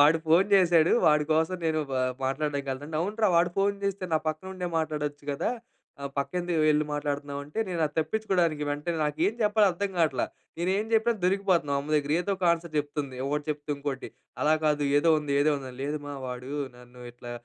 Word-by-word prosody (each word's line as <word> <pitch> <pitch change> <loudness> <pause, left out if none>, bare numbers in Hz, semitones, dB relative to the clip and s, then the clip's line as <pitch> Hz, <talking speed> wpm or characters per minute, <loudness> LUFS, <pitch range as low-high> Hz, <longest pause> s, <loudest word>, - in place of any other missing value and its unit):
వాడు 150 +3 +6
ఫోన్ 185 +5 +4
జేసేడు. 175 -4 +5 0.2
వాడి 150 -1 +3
కోసం, 160 +3 +1
నేను 155 -1 +1
వా 130 - +1 0.2
మాట్లాడడానికెళ్తాను." 140 -1 -2
అంటే, 155 - -2
అవునురా! 210 +2 +1
వాడు 175 +1 +2
ఫోన్ 200 0 +1
జేస్తే, 200 -1 -2
నా 155 - +2
పక్కనుండే 180 +3 -6
మాట్లాడచ్చు 150 -2 -3
కదా! 140 - -1 0.5
ఆహ్, 140 0 -4
పక్కెందుకు 175 +3 -1
వెళ్లి 150 0 +3
మాట్లాడుతున్నావంటే, 145 +1 -4
నేను 170 -2 -2
అది 150 - -11
తప్పించుకోడానికి, 175 -5 0
వెంటనే 150 +3 -2
నాకేం 150 +7 0
చెప్పాలో 210 0 +4
అర్థం 200 +3 -2
కాట్లా. 155 -7 +2 0.3
నేనేం 190 +5 0
చెప్పినా, 225 +1 +4
దొరికిపోతన్నాం 185 -6 +2
అమ్మ 145 +2 -7
దగ్గర. 145 0 +1
ఏదోక 195 0 -3
ఆన్సర్ 170 -1 -1
చెప్తుంది, 145 -2 -3
ఒకటి 145 +1 -1
చెప్తే 150 0 -6
ఇంకోటి. 140 -2 -4 0.3
"అలా 155 +1 +4
కాదు, 150 -1 +2
ఏదో 155 +3 +3
ఉంది, 150 -2 -3
ఏదో 150 +2 +4
ఉంది" 135 -1 -7
అని. 125 - -13
"లేదు 150 +2 -2
మా, 145 - -5
వాడు 125 +1 -6 0.3
నన్ను 125 0 -15
ఇట్లా 120 0 -10
155 Hz, 180 wpm, -27 LUFS, 145-180 Hz, 0.5 s, వాడు